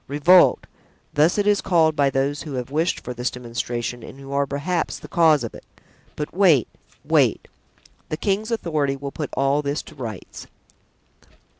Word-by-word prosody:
"Revolt! 155 +6 +5 0.5
thus 155 +5 +3
it 205 - +1
is 205 -1 +3
called 160 -4 +2
by 140 -1 +3
those 135 +2 -1
who 150 - -7
have 125 0 -4
wished 160 +4 0
for 125 - -6
this 125 +1 -2
demonstration 120 0 -4
and 135 - -11
who 135 0 -10
are, 140 0 +1
perhaps, 150 +6 -2
the - - -11
cause 160 -5 +3
of 115 - -5
it; - - -12 0.5
but, 150 - -5
wait, 170 - +4 0.4
wait! - - +2 0.6
the 155 - -3
king's 205 +5 -1
authority 155 -11 -1
will 140 0 -6
put 150 0 -5
all 140 +2 +2
this 145 +1 -3
to - - -13
rights." 115 - -8
145 Hz, 170 wpm, -22 LUFS, 135-165 Hz, 0.6 s, Revolt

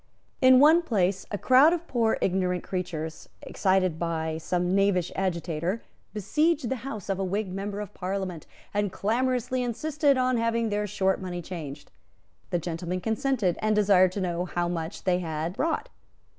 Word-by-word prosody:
In 255 -1 +7
one 315 +5 +7
place 195 - 0
a 205 - -2
crowd 265 - +6
of 340 -1 -3
poor 230 -7 +1
ignorant 180 -1 0
creatures, 160 -4 -5
excited 185 -4 +1
by 160 -1 -2
some 180 +2 -1
knavish 195 -3 +2
agitator, 175 +1 -2 0.3
besieged 290 - +1
the 265 - -1
house 225 -4 -7
of 195 -1 -1
a - - 0
Whig 190 0 -2
member 200 +1 -4
of 210 -3 -6
Parliament, 185 -3 -4 0.3
and 205 -1 0
clamorously 250 +5 0
insisted 280 +3 +1
on 255 -1 +2
having 230 0 0
their 210 0 -1
short 190 -1 0
money 175 -2 -5
changed. 150 -5 -8 0.6
The 175 - +1
gentleman 170 +2 -3
consented, 220 -1 0
and 215 0 +2
desired 195 -3 +5
to 200 - -3
know 175 -1 -1
how 175 -1 -1
much 170 +1 -4
they 180 -1 +2
had 160 0 -3
brought. 325 - -1
195 Hz, 160 wpm, -27 LUFS, 180-230 Hz, 0.6 s, In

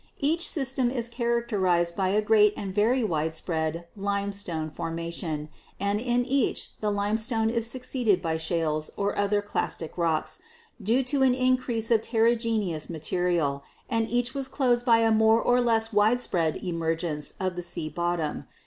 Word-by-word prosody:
Each 325 +5 +2
system 265 -4 0
is 240 -2 -2
characterized 215 -8 0
by 190 -1 +1
a 210 +2 +2
great 210 -1 +4
and 195 -2 -4
very 230 +5 +2
widespread 160 -1 -2
limestone 200 -5 -3
formation, 165 -1 -4 0.3
and 200 +1 0
in 245 +1 +1
each 270 -1 0
the 210 - +1
limestone 220 +3 +1
is 230 -1 -1
succeeded 250 -5 0
by 165 -2 -1
shales 160 -2 -1
or 200 0 0
other 205 0 +1
clastic 175 -5 -3
rocks, 165 -2 0 0.4
due 230 +7 +2
to 270 +2 -1
an 260 -2 +4
increase 255 -3 0
of 225 -2 +5
ter 225 -1 +1
rigenous 225 -9 0
material, 165 -3 -1 0.3
and 225 -1 +1
each 245 +1 0
was 275 -1 -3
closed 250 -2 +1
by 230 -1 +6
a 225 0 +3
more 220 +1 +5
or 245 +1 +3
less 225 -2 +1
widespread 205 -7 +2
emergence 165 -3 -2
of 185 -1 -1
the 175 - -3
sea 170 -2 -5
bottom. 175 -2 -2
210 Hz, 155 wpm, -27 LUFS, 170-235 Hz, 0.4 s, by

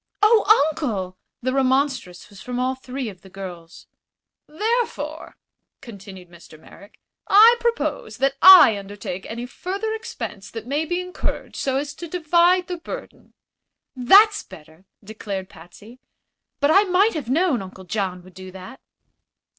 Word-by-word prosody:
"Oh, 425 -7 +5
Uncle!" 205 - -4 0.3
The 255 +1 -1
remonstrance 265 -8 -1
was 200 - -14
from 250 0 -6
all 255 +1 0
three 260 0 -6
of 190 -4 -10
the 190 - -16
girls. 180 -3 -10 0.6
"Therefore," 450 +9 -3 0.4
continued 195 -7 -12
Mr. 170 -2 -16
Merrick, 200 +5 -17 0.3
"I 445 +4 +7
propose 470 0 -2
that 270 0 +1
I 360 - +9
undertake 195 -2 -8
any 235 +2 -6
further 390 - -5
expense 440 - -7
that 225 -1 -8
may 290 +5 -2
be 350 +3 -2
incurred, 365 0 -5
so 265 -1 -1
as 285 +1 -4
to 340 +4 -9
divide 350 +2 +2
the 360 -1 -5
burden." - - -10 0.6
"That's 400 - +5
better!" 160 +4 -16 0.2
declared 200 -2 -7
Patsy. 205 +9 -16 0.6
"But 285 +2 +2
I 390 - +6
might 390 +4 +2
have 290 -7 -5
known 310 - +1
Uncle 190 0 -11
John 185 -1 -4
would 185 0 -17
do 185 0 -11
that." 190 +7 -12
255 Hz, 145 wpm, -22 LUFS, -, 0.6 s, I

